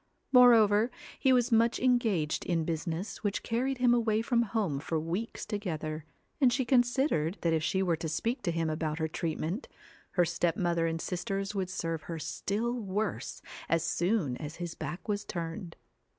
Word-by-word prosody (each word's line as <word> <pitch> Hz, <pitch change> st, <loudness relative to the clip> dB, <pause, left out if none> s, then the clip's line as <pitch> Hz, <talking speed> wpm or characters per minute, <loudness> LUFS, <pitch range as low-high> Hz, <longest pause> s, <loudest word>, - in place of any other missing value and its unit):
Moreover, 230 Hz, -3 st, +6 dB, 0.3 s
he 265 Hz, -, +4 dB
was 250 Hz, -1 st, +3 dB
much 230 Hz, +1 st, +3 dB
engaged 225 Hz, -12 st, +2 dB
in 165 Hz, -3 st, +1 dB
business 165 Hz, +6 st, -3 dB
which 205 Hz, -1 st, -1 dB
carried 255 Hz, +4 st, 0 dB
him 245 Hz, -1 st, +4 dB
away 225 Hz, -2 st, +2 dB
from 235 Hz, 0 st, +2 dB
home 205 Hz, -10 st, -1 dB
for 160 Hz, +2 st, -2 dB
weeks 175 Hz, +9 st, -3 dB
together, 155 Hz, -7 st, -4 dB, 0.4 s
and 255 Hz, -3 st, +6 dB
she 260 Hz, 0 st, +1 dB
considered 245 Hz, -, +2 dB
that 165 Hz, -1 st, +2 dB
if 160 Hz, -, +2 dB
she 190 Hz, +4 st, +1 dB
were 170 Hz, -3 st, +1 dB
to 160 Hz, 0 st, -4 dB
speak 230 Hz, -, -1 dB
to 180 Hz, -, 0 dB
him 165 Hz, -1 st, 0 dB
about 155 Hz, 0 st, -2 dB
her 160 Hz, -1 st, 0 dB
treatment, 165 Hz, -, -3 dB, 0.5 s
her 175 Hz, -, +4 dB
step 170 Hz, 0 st, 0 dB
mother 170 Hz, -3 st, +1 dB
and 165 Hz, 0 st, -2 dB
sisters 195 Hz, +3 st, -3 dB
would 190 Hz, -3 st, -2 dB
serve 165 Hz, -3 st, -3 dB
her 165 Hz, -, -3 dB
still 215 Hz, +8 st, -2 dB
worse 200 Hz, -, -3 dB, 0.3 s
as 165 Hz, 0 st, +2 dB
soon 170 Hz, -, 0 dB
as 150 Hz, 0 st, -6 dB
his 175 Hz, -1 st, -5 dB
back 175 Hz, -, -6 dB
was 205 Hz, -1 st, -1 dB
turned. 165 Hz, 0 st, -5 dB
185 Hz, 175 wpm, -30 LUFS, 165-230 Hz, 0.5 s, Moreover